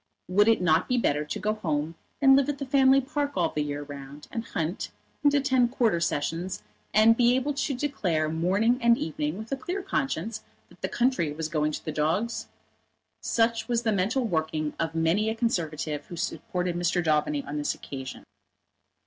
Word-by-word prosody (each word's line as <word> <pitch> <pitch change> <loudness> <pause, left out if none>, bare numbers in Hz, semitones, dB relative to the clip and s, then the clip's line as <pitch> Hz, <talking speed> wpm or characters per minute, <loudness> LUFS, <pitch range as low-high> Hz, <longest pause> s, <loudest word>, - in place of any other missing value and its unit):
Would 205 +4 +4
it 225 -5 +4
not 165 0 +3
be 250 - +1
better 150 -10 +1
to - - -4
go 215 0 0
home 160 -6 -2 0.3
and 270 -1 +8
live 275 +1 +3
at 290 - -1
the 275 - -4
family 270 0 +5
park 285 +1 -2
all - - +2
the 150 - -2
year 145 0 -3
round, 145 0 -10
and 230 - -3
hunt, 165 -4 -3 0.3
and 290 - +6
attend 265 -4 +3
Quarter 225 -10 +2
Sessions, 170 +3 -2 0.3
and 220 +2 +6
be 245 +1 +4
able 270 +3 0
to 280 0 -1
declare 195 - 0
morning 190 +10 +1
and 235 0 +5
evening 150 +1 -3
with 220 +1 -8
a - - +1
clear 360 +8 -4
conscience 220 - -2 0.3
that - - -20
the - - -2
country 240 - +1
was 155 +1 -4
going 155 -1 0
to - - -6
the 155 - -2
dogs? 165 +10 -1 0.7
Such 230 0 +1
was 240 -1 0
the 220 - +2
mental 215 +7 +1
working 160 -5 -1
of 165 0 -2
many 165 +7 +2
a 220 - -2
Conservative 160 -9 -2
who 175 - -7
supported 180 +1 -2
Mr. 175 0 +1
Daubeny 150 -2 +1
on 145 +1 -4
this 145 - -1
occasion. 130 -2 -8
185 Hz, 190 wpm, -27 LUFS, 155-240 Hz, 0.7 s, and